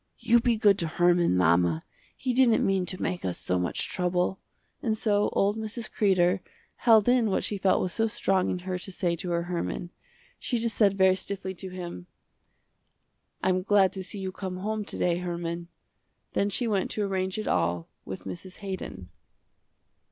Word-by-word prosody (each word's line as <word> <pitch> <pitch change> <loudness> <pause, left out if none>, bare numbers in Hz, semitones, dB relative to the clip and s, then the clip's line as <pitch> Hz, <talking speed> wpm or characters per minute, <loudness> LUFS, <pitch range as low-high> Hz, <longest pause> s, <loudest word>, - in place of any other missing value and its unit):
"You 235 +1 +4
be 235 -1 +2
good 205 -3 +4
to 170 - 0
Herman, 175 - +3
mama, 85 -1 +3 0.3
he 255 -2 -1
didn't 245 -3 +4
mean 190 -2 +1
to 185 - -3
make 180 - -2
us 90 -2 -2
so 90 0 -1
much 90 - -1
trouble," 180 +1 0 0.4
and 220 -3 0
so 205 -2 +2
old 205 +2 +2
Mrs. 220 +1 -5
Kreder, 185 -2 +3 0.4
held 225 -3 +5
in 245 -3 +4
what 190 - 0
she 205 - -1
felt 190 0 +3
was 180 - -1
so 225 0 +2
strong 195 -3 +1
in - - -1
her 185 -1 -2
to 195 - -6
say 175 -2 0
to 180 +1 -5
her 170 0 0
Herman. 175 0 -3 0.5
She 245 - -1
just 230 -1 -1
said 200 -3 +3
very 190 -1 +5
stiffly 190 0 -4
to 190 +1 -6
him, 175 - -7 1.4
"I'm 185 0 +2
glad 195 0 +3
to 190 - -5
see 205 - -7
you 190 -1 -4
come 185 -1 -5
home 215 +3 -2
to - - -3
day, 175 -1 +1
Herman." 170 -1 -4 0.7
Then 200 - +1
she 235 +4 -1
went 200 -4 0
to 210 - -1
arrange 190 -1 -1
it 215 - -3
all 85 0 0 0.2
with 95 - -7
Mrs. 95 - -8
Haydon. 180 - -6
190 Hz, 185 wpm, -27 LUFS, 175-205 Hz, 1.4 s, held